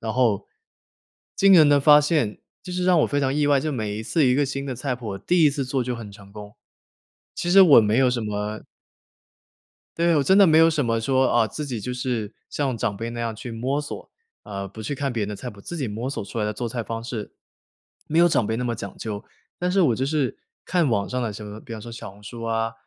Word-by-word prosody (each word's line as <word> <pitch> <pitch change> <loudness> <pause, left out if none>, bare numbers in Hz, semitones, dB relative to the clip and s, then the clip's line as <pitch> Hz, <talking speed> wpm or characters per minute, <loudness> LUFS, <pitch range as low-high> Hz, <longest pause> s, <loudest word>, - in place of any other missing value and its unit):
然 110 -1 -3
后 120 -6 +1 0.9
惊 195 0 +5
人 155 -4 +7
的 145 -1 +5
发 150 +1 +7
现， 145 -8 0 0.2
就 180 - -8
是 180 0 -2
让 180 -2 +4
我 - - +3
非 145 - -1
常 135 -1 +1
意 145 -1 +1
外， 140 -2 +3
就 155 - -3
是 - - -3
每 105 -2 -3
一 110 - -5
次 150 +4 +1
一 125 - +3
个 145 - +2
新 140 +1 -4
的 130 - -3
菜 130 +1 -3
谱， 110 -5 -6
第 175 - +2
一 - - +7
次 140 -1 -3
做 130 -1 -1
就 125 - -2
很 110 -3 -8
成 100 -1 -15
功， 105 +1 -11 0.8
其 175 - -3
实 195 +2 +7
我 150 -9 +8
没 105 +2 +1
有 130 -1 +4
什 120 -2 -2
么 105 0 -4 1.4
对， 170 -1 +3
我 145 - +3
真 190 +8 +4
的 200 -2 +7
没 160 0 +5
有 165 0 +7
什 155 -4 0
么 115 -1 0
说， 130 +3 +2
哦， 115 -2 +3
自 150 +8 -6
己 120 -6 -4
就 125 +4 -4
是 120 -4 -3 0.2
像 135 -4 -1
长 100 -2 -2
辈 115 +3 -4
那 120 0 -5
样 115 -1 -2
去 120 +3 -8
摸 130 +6 -2
索， 145 - -8 0.3
呃， 100 -1 -6
不 110 +3 -10
去 125 +7 -3
看 140 -1 -2
别 115 - -2
人 100 - -2
的 105 - -5
菜 125 - -7
谱， 105 - -14
自 175 - -7
己 140 -6 -2
摸 115 +5 -4
索 120 - -4
出 115 - -7
来 105 - 0
的 105 - -1
做 120 +2 -4
菜 120 0 -4
方 115 0 -5
式， 115 -4 -6 0.8
没 160 +2 +1
有 175 - +6
长 125 - +2
辈 110 - -1
那 125 - -2
么 120 -1 -1
讲 110 - -8
究。 105 -1 -5 0.3
但 180 0 -1
是 195 +1 +2
我 135 -9 +3
就 130 - -1
是 140 -2 -1 0.3
看 175 -5 +1
网 100 -4 0
上 125 0 -2
的 115 -3 -2
什 105 +1 -8
么 105 +1 -9
比 115 - -11
方 110 - -6
说 115 +2 -9
小 115 -2 -8
红 100 +2 -18
书 115 +2 -9
啊， 115 0 -1
125 Hz, 285 characters per minute, -23 LUFS, 110-145 Hz, 1.4 s, 我